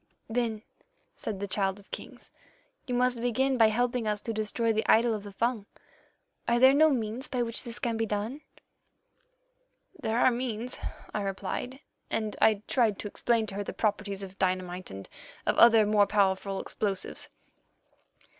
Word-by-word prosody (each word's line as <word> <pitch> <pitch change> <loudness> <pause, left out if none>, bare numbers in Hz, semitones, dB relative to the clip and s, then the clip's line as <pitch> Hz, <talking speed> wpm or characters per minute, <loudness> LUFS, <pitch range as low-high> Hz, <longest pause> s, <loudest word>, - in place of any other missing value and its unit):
"'Then,' 225 -2 -1 0.5
said 205 -3 -5
the 200 - -3
Child 195 0 0
of 200 - -20
Kings, - - -8 0.6
'you 250 - -1
must 250 -1 +1
begin 260 +3 +1
by 225 -3 +6
helping 240 +1 0
us 210 -1 0
to 230 - -3
destroy 225 +1 0
the 220 - 0
idol 230 +1 +5
of 215 - -3
the 205 0 -9
Fung. 225 0 -1 0.8
Are 235 - +3
there 260 +2 +7
no 310 +2 +6
means 245 0 -2
by 250 -2 -1
which 230 -1 -1
this 235 -1 -7
can 230 -2 -1
be 225 0 0
done?' 215 +8 -3 1.6
"'There 220 +1 0
are 255 - +5
means,' 240 0 -3 0.3
I 210 - -1
replied, 225 +7 -4 0.3
and 215 -1 -2
I 215 -2 +4
tried 225 -6 +2
to - - -5
explain 230 +2 +1
to 195 - -6
her 205 - -1
the - - -6
properties 200 -2 -1
of 190 0 -10
dynamite 185 -1 -1
and 95 0 -8 0.4
of - - +2
other 225 -2 +8
more 205 -1 +4
powerful 195 -1 +1
explosives. 195 -3 -3
220 Hz, 165 wpm, -29 LUFS, 205-240 Hz, 1.6 s, other